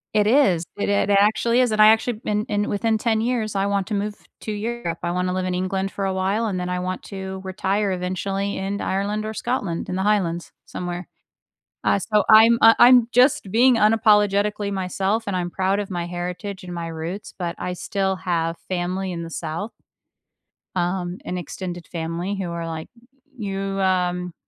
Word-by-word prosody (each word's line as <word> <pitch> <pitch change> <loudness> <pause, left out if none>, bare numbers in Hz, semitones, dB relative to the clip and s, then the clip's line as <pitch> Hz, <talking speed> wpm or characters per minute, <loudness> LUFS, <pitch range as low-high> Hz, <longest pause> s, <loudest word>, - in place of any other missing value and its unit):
It 210 0 +4
is, 205 - +4
it 200 - -1
ac 200 0 +2
actually 230 +4 +3
is, 245 -3 +2
and 215 0 +3
I 215 - +9
actually 225 +2 +4
been 210 0 0
in 205 0 0
within 220 +2 +1
10 220 0 +1
years, 225 -4 -1
I 195 0 +1
want 200 -2 0
to 220 - -4
move 205 +1 -2 0.3
to 215 - -4
Europe. 210 -5 -3
I 170 - 0
wanna 180 +1 -1
live 185 0 -1
in 185 - -1
England 190 +1 -1
for 200 - -4
a 190 - 0
while, 195 +4 0
and 185 -4 -2
then 180 - -3
I 180 0 -1
want 185 +1 -3
to 190 -1 -6
retire 195 +2 0
eventually 195 +2 -2
in 195 +1 -3
Ireland 205 +2 -1
or 220 - -4
Scotland, 210 -9 -2
in 185 - -3
the 190 - -1
Highlands, 180 -5 0
somewhere. 175 0 -5 0.8
Uh, - - +2
so 210 +2 +1
I'm 225 +2 +8
uh, 225 0 +9
I'm 245 -1 +7
just 250 -5 +3
being 245 +4 +5
unapologetically 210 -2 +3
myself, 195 +3 -1
and 200 - -2
I'm 175 -1 -2
proud 190 +3 0
of 200 - -5
my 175 -1 -3
heritage 180 +3 -5
and 180 - -8
my 170 -1 -4
roots, 165 +5 -6
but 175 -2 -4
I 180 - -3
still 190 +1 -1
have 165 -1 -1
family 185 +1 -2
in 170 -2 -4
the 165 - -8
South 165 +7 -4 1.0
um, 180 0 -1
an 180 - -3
extended 175 +1 -6
family 170 +3 -3
who 190 -3 -3
are 170 0 -4
like, 160 -1 -5 0.5
"You" 195 -3 -3 0.2
um, 180 -2 0
195 Hz, 190 wpm, -23 LUFS, 180-210 Hz, 1.0 s, I